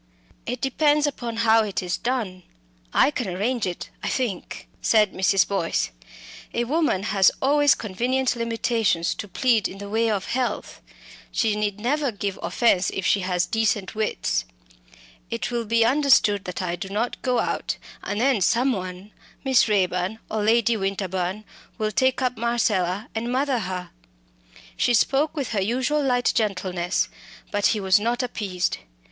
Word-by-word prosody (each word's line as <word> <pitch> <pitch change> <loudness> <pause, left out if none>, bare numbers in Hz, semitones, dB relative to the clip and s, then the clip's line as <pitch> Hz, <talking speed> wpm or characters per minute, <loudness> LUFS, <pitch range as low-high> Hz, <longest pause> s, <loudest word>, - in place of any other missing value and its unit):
"It 245 0 -3
depends 295 +2 +2
upon 240 -5 -3
how 225 0 +5
it 200 -3 -3
is 180 -1 -1
done. 225 -7 -2 0.5
I 285 - +4
can 250 -6 -3
arrange 210 +5 -1
it, 175 - -6
I - - -3
think," 235 -9 -3
said 215 -3 +3
Mrs. 190 +1 +3
Boyce. 170 - -1 0.6
"A 235 - +1
woman 280 - +1
has 195 -2 +4
always 290 +1 +4
convenient 245 +6 -1
limitations 230 -6 0
to 205 - -7
plead 230 +1 +2
in 190 - -10
the 200 0 -8
way 225 +1 +2
of 200 -3 -1
health. 250 0 -3 0.5
She 220 -3 +1
need 210 -1 -2
never 275 +4 0
give 200 -2 -4
offence 195 -6 +2
if 195 - -4
she 205 - +3
has 180 -1 0
decent 220 -3 0
wits. 215 -1 -1 0.9
It - - -3
will 235 -1 -1
be 230 +1 +3
understood 250 -7 +3
that 180 +1 -4
I 175 -1 -1
do 185 +2 -7
not 220 +5 -2
go 250 -2 +1
out, - - -1 0.2
and 205 - -3
then 255 -3 +2
someone 195 -4 0 0.3
Miss 265 -4 +4
Raeburn 185 0 0
or 215 0 -1
Lady 230 +1 +3
Winterbourne 195 0 -2 0.3
will 215 0 -1
take 260 +4 +1
up 250 -2 0
Marcella 215 -4 0
and 230 +2 -3
mother 265 0 +1
her." 185 -3 -5 0.8
She 240 - +2
spoke 285 +7 +2
with 280 -5 -2
her 210 -4 0
usual 260 +8 0
light 245 -2 +2
gentleness, 185 -4 0 0.4
but 205 0 +2
he 215 - +1
was 190 +1 +4
not 235 +4 0
appeased. 200 -7 -2
220 Hz, 155 wpm, -24 LUFS, 195-245 Hz, 0.9 s, how